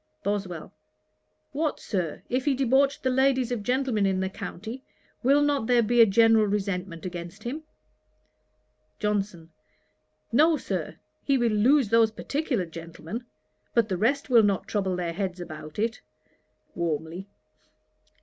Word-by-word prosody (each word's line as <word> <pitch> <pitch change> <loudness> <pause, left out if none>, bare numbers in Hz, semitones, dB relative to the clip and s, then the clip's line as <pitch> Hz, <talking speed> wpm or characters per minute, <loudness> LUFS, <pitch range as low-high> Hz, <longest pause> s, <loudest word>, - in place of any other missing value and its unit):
BOSWELL. 195 -5 -3 0.8
'What, 300 +1 -1
Sir, 180 -7 -3
if 255 +1 -1
he 285 -2 +2
debauched 270 +2 +2
the 260 - +2
ladies 260 -1 +2
of 240 -3 -1
gentlemen 250 -3 +1
in 190 -1 0
the 190 0 -1
county, 220 +8 -7 0.4
will 280 +3 +4
not 285 -6 +1
there 245 -1 +4
be 240 +2 +4
a 225 - +8
general 225 +1 +5
resentment 190 -4 -3
against 175 +3 -7
him?' 270 +7 -4 1.4
JOHNSON. 200 -6 -2 0.8
'No, 310 +6 +5
Sir. - - -4 0.3
He 275 -1 +2
will 240 -2 +2
lose 235 +3 +4
those 230 0 +5
particular 255 - -2
gentlemen; 170 +7 -8 0.5
but 230 -2 +3
the 185 - 0
rest 270 +9 +1
will 240 -4 +6
not 200 -3 +1
trouble 195 -3 -1
their 175 -2 -2
heads 185 0 -3
about 155 -3 -8
it.' 225 +3 -1 0.7
(warmly.) 165 +2 -3
215 Hz, 140 wpm, -26 LUFS, 185-255 Hz, 1.4 s, a